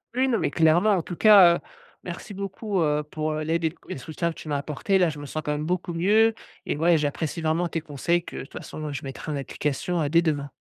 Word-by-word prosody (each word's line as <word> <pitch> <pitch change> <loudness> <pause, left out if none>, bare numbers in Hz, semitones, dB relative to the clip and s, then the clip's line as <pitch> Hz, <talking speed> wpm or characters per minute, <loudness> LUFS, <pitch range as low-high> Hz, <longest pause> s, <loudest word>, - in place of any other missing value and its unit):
Oui, 260 +1 +2
non, 235 -4 +1
mais - - 0
clairement, 165 +5 +4
en 190 -4 +2
tout 175 - -7
cas, 195 -4 +7
heu, - - -4 0.4
merci 180 +4 -7
beaucoup, 195 0 -3
heu, 150 -1 +2
pour 155 +1 -3
l'aide 160 +2 -1
et 160 0 0
et - - -4
le - - -6
soutien 160 +5 -3
que - - -26
tu 155 - -9
m'as 145 - 0
apporté, 150 +7 0
là, 180 -2 +4
je 150 -1 -7
me 145 - -7
sens 155 +3 -4
quand 150 -1 -2
même 150 +1 -3
beaucoup 175 0 -2
mieux 215 +6 +4 0.3
et - - -1
ouais, 165 +2 +3
j'apprécie 150 +2 -2
vraiment 160 +2 0
tes 165 - -2
conseils 160 +3 -1
que - - -9
de - - -4
toute 135 - -12
façon 155 -1 -6
je 140 - -5
mettrai 135 +3 -6
en 145 - -2
application, 150 +5 -2
heu, 145 - -1
dès 170 +2 +4
demain. 145 -4 -1
160 Hz, 260 wpm, -25 LUFS, 150-180 Hz, 0.4 s, cas